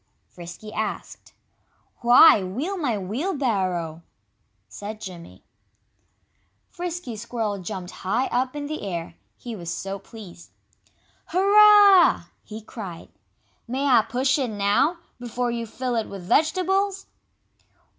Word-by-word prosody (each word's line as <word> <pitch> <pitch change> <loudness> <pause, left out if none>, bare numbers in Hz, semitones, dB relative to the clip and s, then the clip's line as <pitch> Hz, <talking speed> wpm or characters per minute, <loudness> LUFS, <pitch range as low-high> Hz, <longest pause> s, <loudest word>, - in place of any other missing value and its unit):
Frisky 175 +5 -10
asked. 215 -1 -5 0.6
"Why, 240 0 +7
wheel 260 - -3
my 275 - -1
wheelbarrow!" 195 - -2 0.7
said 215 +1 -8
Jimmy. 180 -5 -10 1.3
Frisky 345 -8 -5
Squirrel 215 -2 -3
jumped 180 0 -6
high 225 +8 0
up 255 +3 -1
in 290 0 -4
the 310 +1 -5
air, 170 -5 -5 0.2
he 235 -2 -7
was 170 -4 -6
so 195 +3 -5
pleased. 195 -5 -13 0.8
"Hurrah!" 405 0 +6 0.2
he 215 +1 -9
cried. 195 -7 -9 0.6
"May 265 +4 -2
I 250 -5 +5
push 260 +5 0
it 260 -3 -1
now, 205 - +1 0.2
before 245 0 -3
you 235 -1 -4
fill 250 +2 -3
it 225 -2 -2
with 195 -2 -8
vegetables?" 380 - +1
235 Hz, 115 wpm, -24 LUFS, 195-295 Hz, 1.3 s, Why